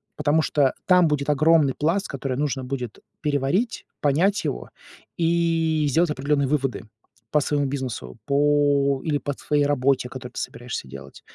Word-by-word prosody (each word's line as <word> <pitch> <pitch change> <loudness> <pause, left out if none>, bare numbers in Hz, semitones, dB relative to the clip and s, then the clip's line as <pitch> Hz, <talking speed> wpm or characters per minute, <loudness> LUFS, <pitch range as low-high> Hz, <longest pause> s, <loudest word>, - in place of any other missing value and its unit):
потому 150 +1 +2
что 145 -4 +2
там 180 -2 +5
будет 150 -1 -1
огромный 150 -1 +4
пласт, 170 +7 0
который 135 -2 -4
нужно 140 -2 -1
будет 125 -3 -5 0.2
переварить, 150 - 0 0.2
понять 170 +8 +2
его, - - -4 0.5
и 165 -2 +1
сделать 165 +4 +2
определённые 140 0 0
выводы 135 -5 -1 0.5
по 150 - +3
своему 145 0 0
бизнесу, 125 - -5
по 145 -1 +2
или 150 -3 +1
по 140 +1 -3
твоей 145 +1 0
работе, 135 -2 +1
которую 125 -1 -8
ты - - -5
собираешься 120 - -6
делать. 70 +1 -11
145 Hz, 150 wpm, -24 LUFS, 135-155 Hz, 0.5 s, там